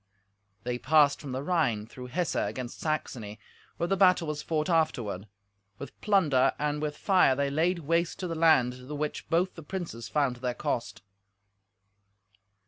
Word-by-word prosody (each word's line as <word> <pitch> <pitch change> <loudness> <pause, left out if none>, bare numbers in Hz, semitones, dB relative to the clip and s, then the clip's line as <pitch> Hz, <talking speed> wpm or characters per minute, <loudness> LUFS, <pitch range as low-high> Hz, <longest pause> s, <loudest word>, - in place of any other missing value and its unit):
They 125 0 -2
passed 145 0 +4
from 140 - -7
the 130 +2 -3
Rhine 145 -11 +1
through 125 +2 -10
Hesse 170 +6 -1
against 125 -2 -3
Saxony, 115 -9 -3 0.4
where 170 - 0
the 195 +3 +1
battle 180 -3 +4
was 150 -1 -3
fought 155 -2 -1
afterward. 125 - 0 0.5
With 140 - -10
plunder 160 -11 +3
and 150 0 -1
with 150 -1 -3
fire 185 -9 +4
they 140 +1 0
laid 170 +5 +1
waste 170 +2 0
to 180 - -2
the 165 - -3
land, 130 -6 +3
the 150 - -4
which 150 +1 -4
both 175 +3 +1
the 165 - -10
princes 155 -8 -6
found 140 -4 +1
to - - -18
their 125 -1 -2
cost. 100 -4 -3
150 Hz, 165 wpm, -28 LUFS, 125-165 Hz, 0.5 s, passed